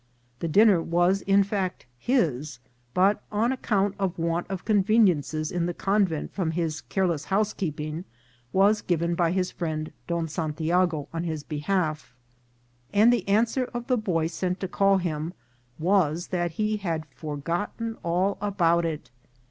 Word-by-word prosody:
The 170 - -2
dinner 200 +1 +5
was 175 +4 +2
in 195 0 +4
fact 195 -5 -3
his; 155 - 0 0.4
but, 195 +3 +3
on 220 +4 +1
ac 260 - -7
count 200 -2 +1
of 190 -3 -1
want 170 +1 -1
of 190 -2 -5
conveniences 190 -8 +2
in 175 -1 0
the 175 - -3
convent 195 -6 0
from 185 -5 -1
his 160 -1 -2
careless 170 -7 -1
housekeeping, 170 -5 -2 0.5
was 205 +3 +4
given 170 -1 0
by 170 -1 +2
his 185 0 0
friend 155 -3 -3 0.2
Don 170 -1 -1
Santiago 160 0 0
on 165 0 -2
his 160 -3 -3
behalf, 155 -3 -2 0.8
and 215 +4 +5
the 220 -6 -1
answer 230 +5 +2
of 240 0 -3
the 255 - +2
boy 180 -7 0
sent 180 +2 -2
to 190 - -1
call 195 +1 +3
him 165 -2 -3 0.4
was 175 -1 +1
that 175 -2 -1
he 215 +4 0
had 165 -6 -3
forgotten 170 - -3
all 180 +4 0
about 170 -5 +2
it. 155 -5 -6
175 Hz, 150 wpm, -26 LUFS, 160-200 Hz, 0.8 s, dinner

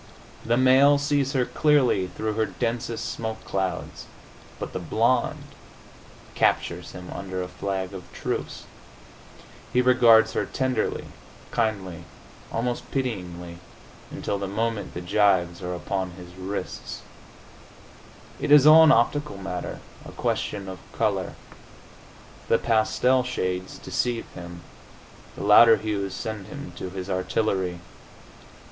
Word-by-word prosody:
The 120 +1 +1
male 135 +3 +6
sees 140 -1 0
her 130 -3 +2
clearly 130 -12 +2
through 110 +3 -3
her 110 0 0
densest 115 +2 -3
smoke 110 -2 -5
clouds.... 95 -1 -3 0.5
But - - -6
the - - -3
blonde - - +1 0.9
captures 85 0 0
him 90 -1 -9
under 95 0 -4
a - - -5
flag 95 +1 -4
of 90 -2 -10
truce. - - -4 1.1
He 125 - +2
regards 120 -3 +5
her - - 0
tenderly, 130 -1 -1 0.5
kindly, 95 -7 -2 0.5
almost 120 +1 -2
pityingly, 90 -10 -4 0.5
until 100 - -3
the 100 - -3
moment 110 0 -2
the 90 - -4
gyves 95 -2 +2
are 90 0 -3
upon 95 0 -3
his 90 -1 -12
wrists. 95 +2 -6 1.4
It - - -2
is 145 -1 +8
all 155 +1 +9
an 160 - +7
optical 130 +1 +2
matter, 95 -3 -5 0.2
a - - -10
question 100 -2 -2
of 95 -1 -7
color. - - -1 1.1
The 115 - +4
pastel 115 +3 +2
shades 95 -7 -3
deceive 120 -2 -2
him; 85 -1 -9 0.7
the - - -6
louder 110 +3 +8
hues 100 -3 -3
send 110 -3 -5
him 145 0 -8
to 95 - -5
his 95 0 -6
artillery. 95 -1 -1
105 Hz, 125 wpm, -25 LUFS, 95-120 Hz, 1.4 s, all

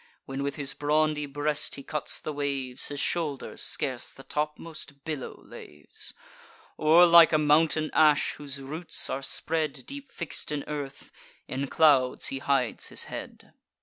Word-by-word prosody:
(When 135 +1 -5
with 140 0 -2
his 140 -2 -1
brawny 150 +1 +1
breast 145 +1 -2
he 140 - -9
cuts 150 +1 -1
the 155 - -5
waves, 140 -3 -1
His 145 -1 -4
shoulders 150 -5 -2
scarce - - 0
the - - -13
topmost 150 -1 -5
billow 155 -5 -5
laves), - - -6 0.6
Or 160 +3 +6
like 170 -1 +8
a 155 - +4
mountain 155 +1 +3
ash, 150 -2 +4
whose 140 -2 -5
roots 155 +5 -4
are 135 - -2
spread, 155 +1 -1
Deep 280 -1 -9
fix'd 170 -3 -3
in 145 -1 -2
earth; 145 -2 -6 0.4
in 135 +2 -3
clouds 135 -4 +4
he 135 - -3
hides 135 -4 0
his - - +1
head. - - -9
150 Hz, 150 wpm, -27 LUFS, 140-155 Hz, 0.6 s, like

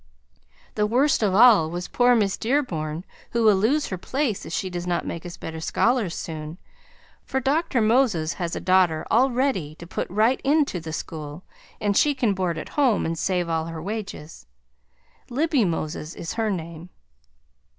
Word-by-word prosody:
The 210 -1 +1
worst 260 +6 +2
of 200 -3 +2
all 215 -8 +7
was 175 +2 -4
poor 245 0 +3
Miss 200 -4 +1
Dearborn, 180 - -2 0.3
who 235 -1 +1
will 215 -2 +6
lose 255 +10 +1
her 185 - -4
place 260 0 -2
if - - -8
she 190 - -2
does 175 -1 -5
not 175 -1 -1
make 170 +1 -5
us 175 - -9
better 160 0 -6
scholars 225 +3 +1
soon, 155 0 -6 0.7
for 265 - -2
Dr. 270 -1 +1
Moses 215 -8 +2
has 170 -1 -2
a - - -3
daughter 185 -4 +2
all 255 +4 +4
ready 240 - -1
to 170 - -11
put 175 - -4
right 220 +7 +2
in 295 +2 +3
to 180 - -4
the 160 -1 -7
school 155 +1 -6 0.4
and 205 -1 0
she 295 +5 +3
can 235 -6 +1
board 180 -3 -1
at - - -6
home 260 -8 +2
and 165 - -1
save 180 +1 -1
all 165 -1 -1
her 165 -1 -6
wages. 185 - -7 0.8
Libby 280 -1 +1
Moses 155 -1 -3
is 165 - -5
her 225 -1 -1
name. 170 -2 -5
190 Hz, 180 wpm, -24 LUFS, 165-245 Hz, 0.8 s, all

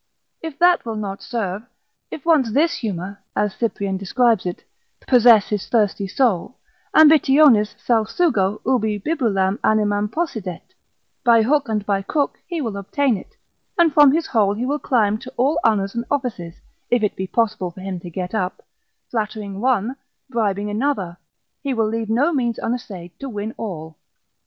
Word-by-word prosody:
If 320 -3 -7
that 350 0 +4
will 225 -2 -4
not 200 -2 -5
serve, 205 -5 -3 0.5
if 295 - -8
once 295 -9 +3
this 325 +6 +3
humour 200 -2 -5 0.2
(as 210 -1 0
Cyprian 200 -4 -2
describes 215 +1 +1
it) 175 - -5 0.4
possess 235 -4 +5
his 205 -2 -3
thirsty 205 -3 +1
soul, 225 +1 0 0.4
ambitionis 290 -7 +6
salsugo 220 - +1
ubi 220 -4 +1
bibulam 205 -7 0
animam 210 -1 +1
possidet, 220 - -4 0.5
by 230 -2 +5
hook 280 +1 +1
and 210 -2 -1
by 200 -1 0
crook 285 +8 -1
he 340 -3 -3
will 225 -6 -3
obtain 255 +6 0
it, 190 - -10 0.4
and 335 -4 +4
from 290 -2 +7
his 325 +3 0
hole 205 -4 +1
he 235 +4 -3
will 290 +3 -1
climb 215 -6 +1
to 255 +1 -10
all 285 +6 +2
honours 200 -3 +1
and 235 0 -3
offices, 225 -12 -3 0.3
if 240 -2 +2
it 210 - 0
be 190 - -4
possible 215 -4 0
for 180 +2 -12
him 190 -1 -5
to 175 - -9
get 180 +2 -5
up, 185 -4 -2 0.5
flattering 210 -3 -4
one, 250 -1 +1 0.4
bribing 210 -3 -1
another, 210 -7 -1 0.5
he 275 -3 -2
will 225 -2 +1
leave 225 0 -3
no 270 +10 +2
means 240 -5 0
unessay'd 200 -8 -5
to 275 - -6
win 215 0 -5
all. 160 -7 -7
220 Hz, 160 wpm, -21 LUFS, 200-260 Hz, 0.5 s, from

